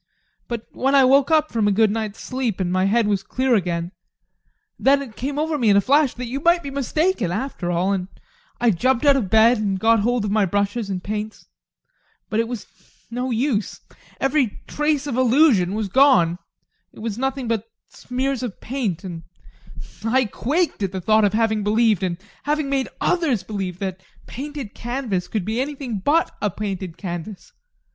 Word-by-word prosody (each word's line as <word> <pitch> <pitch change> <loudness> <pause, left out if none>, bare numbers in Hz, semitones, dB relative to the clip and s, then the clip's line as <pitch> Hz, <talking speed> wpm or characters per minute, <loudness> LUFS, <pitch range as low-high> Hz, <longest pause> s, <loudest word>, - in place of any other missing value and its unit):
But 235 -2 -4
when 270 +2 +1
I 275 - +7
woke 275 +2 +4
up 310 -1 +3
from 220 -3 +1
a - - +3
good 215 +1 +3
night's 220 -1 -3
sleep 255 -6 -3
and 180 -2 -1
my 185 0 +2
head 225 +3 +3
was 200 -2 +1
clear 255 +5 0
again, 175 -4 0 0.9
then 275 +1 +4
it 255 -6 -8
came 275 +3 -4
over 305 0 0
me 230 -4 +3
in 200 - +6
a - - +7
flash 280 +5 +3
that 250 - -5
you 255 +4 -4
might 340 +3 +3
be 280 - -5
mistaken 280 - 0
after 205 -3 -3
all. 180 +3 +1
And 185 -2 -2 0.5
I 240 -2 +4
jumped 255 - +1
out 280 -1 +6
of 230 -9 -1
bed 225 +3 +5
and 195 -3 -1
got 225 +2 +4
hold 235 +1 +1
of 205 - -2
my 215 0 +3
brushes 200 +3 -1
and 185 -1 -3
paints 215 +1 -5 0.9
but 215 - +1
it 230 - +1
was 240 -3 -6 0.5
no 250 +2 -2
use! 235 -3 -1 0.4
Every 270 -5 +1
trace 295 -1 0
of 265 -4 -3
illusion 245 - +4
was 215 -1 -1
gone 195 -8 +4 0.5
it - - -21
was 225 0 -4
nothing 265 -1 -2
but 225 -1 -2 0.2
smears 260 +1 -3
of 240 -6 -5
paint, 220 -9 -3
and 175 -3 -6 0.8
I 250 +3 +2
quaked 300 - -1
at 195 -1 -1
the 190 - -2
thought 215 +3 +3
of 205 - +1
having 220 -1 +1
believed, 215 -1 +2
and 180 -2 -1 0.2
having 295 -1 -1
made 270 -1 0
others 295 - +1
believe, 190 -3 -4
that 190 -1 -4
a 190 - -29
painted 280 -4 -7
canvas 240 -7 -3
could 210 -5 -3
be 225 +3 -1
anything 270 -6 -4
but 300 - +2
a 210 - +1
painted 190 -3 -5
canvas. 180 +1 -7
225 Hz, 190 wpm, -22 LUFS, 200-270 Hz, 0.9 s, I